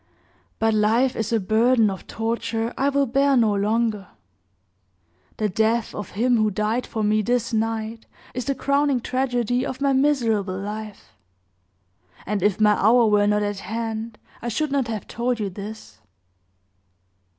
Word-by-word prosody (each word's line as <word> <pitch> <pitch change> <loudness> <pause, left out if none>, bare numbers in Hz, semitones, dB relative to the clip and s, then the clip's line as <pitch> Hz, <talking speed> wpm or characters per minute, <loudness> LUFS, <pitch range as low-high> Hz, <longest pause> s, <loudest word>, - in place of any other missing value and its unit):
But 225 0 +2
life 225 +5 +2
is 220 0 -2
a 225 - +2
burden 220 +2 +3
of 190 - -8
torture 225 0 -2
I 275 - +1
will 280 0 +2
bear 275 +2 +2
no 220 -3 +3
longer. 210 0 0 1.3
The 215 - 0
death 220 +3 0
of 205 -3 -7
him 245 +2 +3
who 215 -1 +2
died 215 +5 -1
for 220 - -3
me 215 +1 +2
this 240 +1 -1
night 225 0 -2 0.3
is 250 -1 -4
the 275 - -1
crowning 280 0 +1
tragedy 245 -1 -1
of 260 -1 -4
my 280 -1 +2
miserable 230 -9 +1
life; 210 - -7 1.1
and 205 0 -2
if 205 +1 +1
my 210 -1 +5
hour 235 +3 +5
were 205 -1 +3
not 210 0 +2
at 205 -1 -3
hand, 225 +1 -4 0.2
I 240 - -5
should 290 +6 -1
not 275 -4 0
have 220 -3 -4
told 240 0 -2
you 200 -3 -2
this." 210 +3 -9
225 Hz, 155 wpm, -23 LUFS, 210-245 Hz, 1.3 s, my